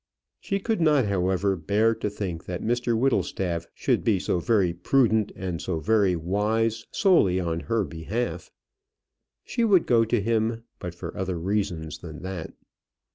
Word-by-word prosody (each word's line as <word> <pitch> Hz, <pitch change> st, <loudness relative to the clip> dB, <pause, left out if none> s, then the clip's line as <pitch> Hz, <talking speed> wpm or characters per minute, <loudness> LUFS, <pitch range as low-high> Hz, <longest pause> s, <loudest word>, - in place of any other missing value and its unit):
She 195 Hz, -, -2 dB
could 220 Hz, -1 st, -1 dB
not, 150 Hz, -6 st, +4 dB
however, 95 Hz, 0 st, +1 dB
bear 105 Hz, +7 st, +2 dB
to 105 Hz, -, -3 dB
think 95 Hz, -5 st, -5 dB
that 90 Hz, -1 st, -5 dB
Mr 120 Hz, 0 st, 0 dB
Whittlestaff 95 Hz, -9 st, 0 dB
should -, -, 0 dB
be 110 Hz, -4 st, +3 dB
so 90 Hz, -, -1 dB
very 95 Hz, -2 st, +2 dB
prudent 110 Hz, +3 st, +2 dB
and 90 Hz, -2 st, -4 dB
so 85 Hz, -4 st, -2 dB
very 100 Hz, +2 st, +2 dB
wise 110 Hz, +6 st, 0 dB
solely 130 Hz, -, +3 dB
on 85 Hz, -2 st, -1 dB
her 115 Hz, +4 st, 0 dB
behalf. 90 Hz, +2 st, -4 dB, 0.9 s
She 235 Hz, -, -1 dB
would 195 Hz, -6 st, +4 dB
go 115 Hz, -2 st, +4 dB
to 115 Hz, +1 st, +1 dB
him, 115 Hz, +2 st, 0 dB, 0.2 s
but 90 Hz, -1 st, -6 dB
for 85 Hz, -1 st, -7 dB
other 95 Hz, -1 st, -2 dB
reasons 85 Hz, -4 st, -2 dB
than 80 Hz, 0 st, -9 dB
that. 95 Hz, -3 st, -5 dB
100 Hz, 155 wpm, -26 LUFS, 90-115 Hz, 0.9 s, not